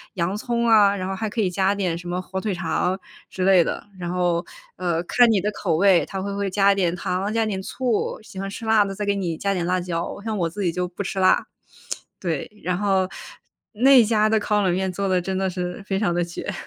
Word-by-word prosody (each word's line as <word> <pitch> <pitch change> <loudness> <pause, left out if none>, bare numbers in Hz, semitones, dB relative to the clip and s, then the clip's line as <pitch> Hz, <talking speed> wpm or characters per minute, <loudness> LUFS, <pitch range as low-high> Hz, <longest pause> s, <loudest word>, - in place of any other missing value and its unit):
洋 185 +2 -1
葱 235 +1 -1
啊， 205 -3 +6
然 185 -1 -3
后 195 - -2
还 220 +3 -3
可 220 +2 -2
以 190 - +1
加 190 +2 +1
点 185 -4 -1
什 175 +1 -9
么 180 +1 -2
火 190 +1 -5
腿 210 -2 -1
肠 180 +2 -1 0.3
之 185 - -3
类 190 -3 +6
的。 - - -4
然 175 -1 -3
后， 175 -1 0 0.3
呃， 170 -2 0
看 245 +7 +4
你 200 - +2
的 210 +3 -1
口 185 -5 -1
味， 190 -1 +4
他 190 -1 -5
会 200 0 -4
会 200 -1 -1
加 200 +1 +4
一 - - +2
点 180 -3 +1
糖， 185 +4 -2
加 225 0 +2
一 - - -1
点 195 -3 -2
醋， 245 -1 -1
喜 195 - -10
欢 195 - -3
吃 215 - -8
辣 215 -2 +5
的， 195 - -4
再 210 - -4
给 200 0 +1
你 175 -5 -2
加 200 +3 0
点 175 -2 -1
辣 180 +1 +1
椒， 170 -1 -3
像 220 -1 -2
我 170 -3 +1
自 205 +5 -6
己 175 - +1
就 180 +1 -2
不 180 +3 -7
吃 195 - -5
辣。 185 0 +3 0.7
对， 165 -1 -3
然 180 0 0
后 190 -2 +1 0.7
那 255 +3 +6
家 215 -1 +2
的 220 - +3
烤 210 0 +1
冷 185 -2 +2
面 190 0 -1
做 195 +2 -2
得 185 -1 +2
真 190 +1 -3
的 190 - 0
是 180 +1 -5
非 195 -1 0
常 200 -5 +1
地 175 - +1
绝。 175 - -6
190 Hz, 270 characters per minute, -23 LUFS, 180-205 Hz, 0.7 s, 啊